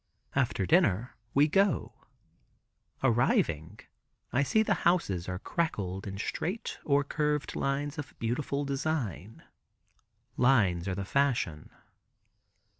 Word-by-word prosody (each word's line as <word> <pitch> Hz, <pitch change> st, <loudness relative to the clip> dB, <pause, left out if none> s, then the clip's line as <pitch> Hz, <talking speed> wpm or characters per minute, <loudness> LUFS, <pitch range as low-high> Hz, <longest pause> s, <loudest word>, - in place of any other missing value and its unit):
After -, -, +1 dB
dinner 110 Hz, +8 st, +2 dB, 0.2 s
we 145 Hz, +2 st, +6 dB
go. 195 Hz, +4 st, +2 dB, 1.1 s
Arriving, 110 Hz, -, +1 dB, 0.5 s
I 130 Hz, -, +3 dB
see 220 Hz, +10 st, +3 dB
the 210 Hz, -, +2 dB
houses 100 Hz, -, +1 dB
are 90 Hz, -, -2 dB
crackled 95 Hz, -, -2 dB
in 100 Hz, 0 st, -5 dB
straight 180 Hz, -, -3 dB
or 145 Hz, -2 st, +3 dB
curved 150 Hz, 0 st, -1 dB
lines 145 Hz, +3 st, -1 dB
of 145 Hz, -, -7 dB
beautiful 140 Hz, +5 st, -2 dB
design. 135 Hz, -, -3 dB, 0.9 s
Lines 100 Hz, -9 st, +3 dB
are 95 Hz, -, -1 dB
the 100 Hz, 0 st, -4 dB
fashion. 115 Hz, -, 0 dB
135 Hz, 110 wpm, -30 LUFS, 95-150 Hz, 1.1 s, we